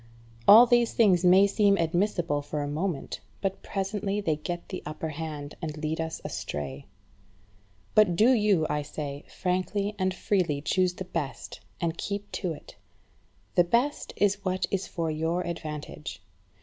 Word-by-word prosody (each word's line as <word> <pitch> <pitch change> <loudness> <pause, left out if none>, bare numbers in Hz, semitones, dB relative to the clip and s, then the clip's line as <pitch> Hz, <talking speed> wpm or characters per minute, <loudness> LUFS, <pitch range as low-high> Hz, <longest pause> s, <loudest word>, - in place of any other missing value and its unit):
All 225 +4 +10
these 240 -1 +3
things 190 -6 +4
may 185 +2 +7
seem 200 0 +3
admissible 170 -2 0
for 145 +1 -3
a - - -3
moment; 155 +1 -3 0.2
but 195 -1 -2
presently 200 +1 -2
they 160 -7 0
get 170 +3 -5
the 185 - -5
upper 155 +1 -5
hand, 150 -2 -6
and 155 -2 -4
lead 155 +1 -2
us 160 0 -4
astray. 70 -2 -5 1.1
But 210 -5 +5
do 220 +8 +5
you, 210 -9 +3
I 150 - -1
say, 145 -1 -6
frankly 190 +3 -1
and 185 0 +1
freely 185 -6 0
choose 180 +4 +1
the 190 - -6
best, 160 -6 -5 0.2
and 170 -1 -2
keep 205 0 -4
to 180 -4 -2
it. 155 - -10 0.8
The 175 - +5
best 240 +11 0
is 205 -1 +1
what 185 -1 0
is 195 -1 -1
for 165 -2 -2
your 165 +3 -1
advantage. 150 - -6
175 Hz, 155 wpm, -28 LUFS, 155-200 Hz, 1.1 s, All